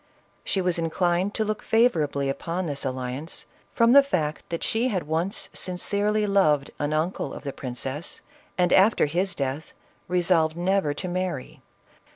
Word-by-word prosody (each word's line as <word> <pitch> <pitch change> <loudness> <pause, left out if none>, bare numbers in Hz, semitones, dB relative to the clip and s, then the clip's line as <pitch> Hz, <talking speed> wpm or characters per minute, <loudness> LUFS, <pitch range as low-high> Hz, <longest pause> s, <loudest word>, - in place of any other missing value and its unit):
She 195 - 0
was 180 -2 +1
inclined 175 +3 0
to 220 - 0
look 215 0 -2
favorably 155 - +2
upon 170 +6 -2
this 145 -3 -2
alliance, 130 +4 -4 0.3
from 230 0 +4
the 280 +2 +9
fact 160 - -2
that 170 - -3
she 230 +3 +1
had 195 -8 -1
once 165 +6 -1
sin 180 -1 -3
cerely 210 +3 +1
loved 155 -8 +3
an 145 0 -1
uncle 155 +4 -1
of - - -9
the 140 -2 -4
princess, 130 +4 -5 0.4
and 180 -1 +3
after 195 0 +5
his 180 +6 0
death 140 +2 -3 0.3
resolved 170 -3 +2
never 175 -4 +1
to 185 - -4
marry. 180 -6 -4
175 Hz, 160 wpm, -25 LUFS, 150-195 Hz, 0.4 s, the